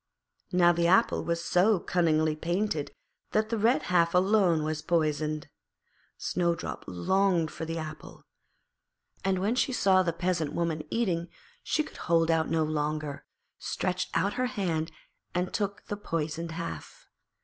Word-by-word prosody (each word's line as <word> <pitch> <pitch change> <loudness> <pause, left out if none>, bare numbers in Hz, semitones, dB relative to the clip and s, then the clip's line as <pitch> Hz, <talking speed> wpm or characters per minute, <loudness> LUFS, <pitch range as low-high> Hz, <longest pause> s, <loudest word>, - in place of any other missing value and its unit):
Now 175 -1 +5
the 170 0 +2
apple 190 +6 +3
was 170 0 -1
so 190 +2 +4
cunningly 155 -3 +2
painted 170 -1 -1 0.4
that 215 0 +2
the 230 - 0
red 230 +5 +3
half 170 -1 +3
alone 185 -4 +4
was 155 0 -2
poisoned. 155 -2 0 0.7
Snowdrop 170 -2 -2
longed 170 - +1
for 160 - -5
the 165 +1 -4
apple, 155 -1 -8 1.0
and 190 -1 +1
when 200 +5 +1
she 255 +2 +1
saw 190 -6 +4
the 175 -2 0
Peasant 170 -3 -1
Woman 165 -2 -1
eating 175 -7 0 0.3
she 310 - 0
could - - -12
hold 165 -1 +2
out 160 -1 +1
no 160 -1 +2
longer, 150 -1 -2 0.3
stretched 185 0 -2
out 200 +2 +2
her 255 0 0
hand 170 -9 -2 0.4
and 180 +1 -1
took 205 -1 -2
the 205 - -4
poisoned 165 -3 -3
half. 160 - -7
170 Hz, 145 wpm, -29 LUFS, 160-190 Hz, 1.0 s, Now